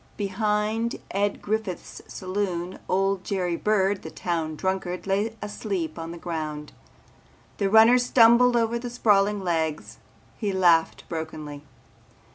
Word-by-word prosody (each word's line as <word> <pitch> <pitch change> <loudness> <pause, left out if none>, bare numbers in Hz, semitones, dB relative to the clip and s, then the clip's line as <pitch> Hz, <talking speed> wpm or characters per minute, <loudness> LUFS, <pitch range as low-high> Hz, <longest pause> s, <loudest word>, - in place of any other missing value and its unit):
Behind 210 +3 -1 0.2
Ed 200 +1 -1
Griffith's 215 -3 -4
saloon 185 -2 -3
old 195 0 +1
Jerry 180 -3 -1
Bird 200 0 +1
the 160 - -8
town 160 -2 -3
drunkard 190 +1 -3
lay 205 +3 0
asleep 190 -6 -4
on 165 0 -5
the 170 - -8
ground. 155 -3 -5 0.9
The 200 -2 +1
runner 225 +4 +7
stumbled 245 0 +5
over 230 0 +1
the 245 0 -5
sprawling 210 -4 +2
legs. 160 - -2 0.4
He 210 -3 -1
laughed 175 -3 +3
brokenly. 155 -3 -6
195 Hz, 120 wpm, -25 LUFS, 170-215 Hz, 0.9 s, runner